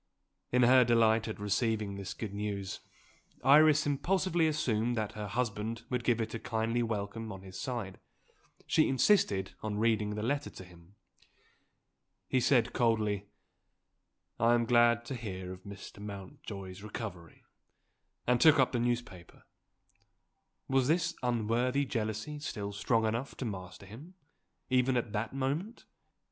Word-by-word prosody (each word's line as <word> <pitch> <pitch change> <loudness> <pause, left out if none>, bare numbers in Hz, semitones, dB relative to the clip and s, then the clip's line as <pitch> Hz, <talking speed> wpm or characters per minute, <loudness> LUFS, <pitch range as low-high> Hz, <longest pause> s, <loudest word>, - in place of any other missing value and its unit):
In 125 0 +4
her 130 +1 +7
delight 115 -1 +3
at 110 - -5
receiving 105 0 0
this 100 -1 -6
good 105 -3 -5
news 100 -2 -4 0.6
Iris 150 +3 +6
impulsively 170 +3 +1
assumed 120 -6 0
that 110 -2 -1
her 105 -1 -6
husband 115 0 -2
would 125 -1 -1
give 120 -1 +2
it 110 -1 -3
a 115 - -3
kindly 115 +2 -1
welcome 110 0 -3
on 95 -1 -9
his 95 -1 -9
side; 115 -7 -4 0.7
she 155 - +3
insisted 125 - +2
on 105 -1 -3
reading 110 -1 +1
the 105 - -3
letter 140 +5 -1
to - - -11
him. 90 +1 -18 1.3
He 130 - +2
said 120 -2 +3
coldly, 110 -4 +1 1.1
"I 115 +1 +5
am 120 -1 +1
glad 120 0 +4
to 125 - -5
hear 95 -6 -5
of 95 +2 -14
Mr. 100 0 -10
Mountjoy's 100 -1 -8
recovery" 100 -6 -8 0.8
and 125 -1 +2
took 155 -1 +7
up 130 -2 +3
the 120 - 0
newspaper. 120 -7 -3 1.2
Was 135 -1 +2
this 165 +2 +2
unworthy 125 +3 +1
jealousy 115 +4 -3
still 105 -9 -5
strong 115 +2 +1
enough 115 +5 -2
to 130 - -4
master 95 -3 -7
him, 140 - -12 0.5
even 130 0 +2
at 120 -3 -2
that 110 +4 -3
moment? 150 - -3
115 Hz, 140 wpm, -31 LUFS, 105-125 Hz, 1.3 s, her